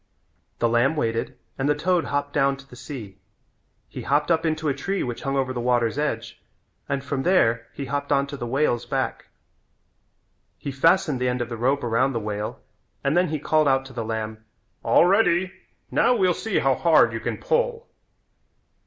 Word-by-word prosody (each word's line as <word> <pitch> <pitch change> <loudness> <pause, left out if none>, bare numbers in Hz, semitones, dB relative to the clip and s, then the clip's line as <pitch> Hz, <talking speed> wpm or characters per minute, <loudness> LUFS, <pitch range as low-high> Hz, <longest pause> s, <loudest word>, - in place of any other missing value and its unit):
The 120 - +2
lamb 120 +6 +2
waited 115 -2 -2 0.2
and 135 +2 +1
the 150 - +3
toad 175 +3 +1
hopped 145 0 -2
down 140 -1 +2
to 135 0 -15
the 125 - -13
sea. 120 -7 -9 0.7
He - - -8
hopped 145 +3 +1
up 165 0 +2
into 155 0 -1
a 140 - +2
tree 195 +7 -2
which 120 -2 -5
hung 135 0 -1
over 130 -1 0
the 120 - -3
water's 120 +1 +1
edge 115 -7 -3 0.5
and 140 -1 -1
from 140 -1 -2
there 120 -10 +2
he 140 - -6
hopped 140 +2 -3
on 140 0 +3
to 140 0 -7
the 120 -3 -5
whale's 125 -2 0
back. - - -2 1.3
He 140 - -5
fastened 155 0 +2
the 125 - +2
end 125 0 -1
of 120 -1 -3
the 120 - -4
rope 130 +5 +1
around 120 +3 +1
the 115 - -1
whale 105 0 -4 0.4
and 140 +3 +1
then 180 +1 +3
he 155 - -2
called 155 +1 +2
out 135 -1 +2
to 135 - -11
the 120 -2 -3
lamb: 110 0 -4 0.4
"All - - +4
ready. 185 -2 +3 0.4
Now 250 - +3
we'll 185 -5 +3
see 220 - -2
how - - +3
hard - - +4
you - - -3
can - - -3
pull." 480 0 -1
135 Hz, 195 wpm, -24 LUFS, 120-155 Hz, 1.3 s, All